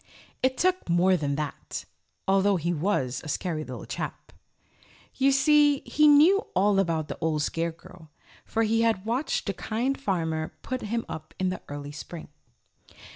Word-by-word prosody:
It 260 Hz, 0 st, +1 dB
took 370 Hz, -, +1 dB
more 180 Hz, +2 st, +4 dB
than 145 Hz, -4 st, -1 dB
that, 150 Hz, -1 st, -5 dB, 0.4 s
although 195 Hz, +1 st, +3 dB
he 170 Hz, 0 st, -1 dB
was 145 Hz, -7 st, -1 dB
a -, -, -8 dB
scary 155 Hz, 0 st, -2 dB
little -, -, -8 dB
chap. -, -, -6 dB, 0.8 s
You 275 Hz, +1 st, +3 dB
see, 290 Hz, +1 st, +4 dB
he 300 Hz, 0 st, +3 dB
knew 305 Hz, +7 st, +7 dB, 0.2 s
all 200 Hz, +1 st, +3 dB
about 165 Hz, -5 st, 0 dB
the -, -, -6 dB
Old 155 Hz, -2 st, +1 dB
Scarecrow, 165 Hz, 0 st, -5 dB, 0.3 s
for 225 Hz, -, 0 dB
he 225 Hz, +1 st, +2 dB
had 220 Hz, -4 st, +1 dB
watched 245 Hz, +6 st, -1 dB
the 200 Hz, -, -1 dB
Kind 240 Hz, +8 st, -2 dB
Farmer 160 Hz, -7 st, -1 dB
put 255 Hz, -1 st, -3 dB
him 230 Hz, +2 st, -2 dB
up 155 Hz, 0 st, -8 dB
in 185 Hz, -1 st, 0 dB
the 185 Hz, -, -4 dB
early 145 Hz, 0 st, -6 dB
Spring. 160 Hz, +2 st, -9 dB
190 Hz, 160 wpm, -27 LUFS, 160-250 Hz, 0.8 s, knew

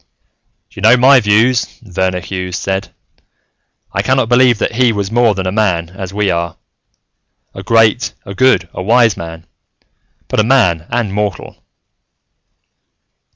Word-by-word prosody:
"You -, -, -11 dB
know 115 Hz, +4 st, +5 dB
my 130 Hz, +2 st, +6 dB
views," 115 Hz, +3 st, +1 dB
Verner 95 Hz, -2 st, -2 dB
Hughes 90 Hz, -1 st, -5 dB
said. 95 Hz, 0 st, -3 dB, 1.0 s
"I 95 Hz, -, 0 dB
cannot 130 Hz, +1 st, 0 dB
believe 125 Hz, -1 st, +4 dB
that -, -, -2 dB
He 125 Hz, 0 st, +2 dB
was 100 Hz, -2 st, -3 dB
more 115 Hz, -2 st, +2 dB
than 95 Hz, -1 st, -4 dB
a 95 Hz, -, -1 dB
man, 95 Hz, -6 st, 0 dB
as 95 Hz, -1 st, -7 dB
we 100 Hz, -1 st, 0 dB
are. 85 Hz, -1 st, -3 dB, 1.0 s
A -, -, -8 dB
great, 115 Hz, +2 st, +1 dB
a 100 Hz, -, -7 dB
good, 130 Hz, +5 st, +2 dB
a -, -, -6 dB
wise 115 Hz, +1 st, +3 dB
man, 80 Hz, 0 st, -9 dB, 0.8 s
but -, -, -2 dB
a -, -, +4 dB
man 95 Hz, -10 st, +1 dB
and 120 Hz, -4 st, -2 dB
mortal." 105 Hz, -4 st, -4 dB
105 Hz, 145 wpm, -14 LUFS, 95-120 Hz, 1.0 s, my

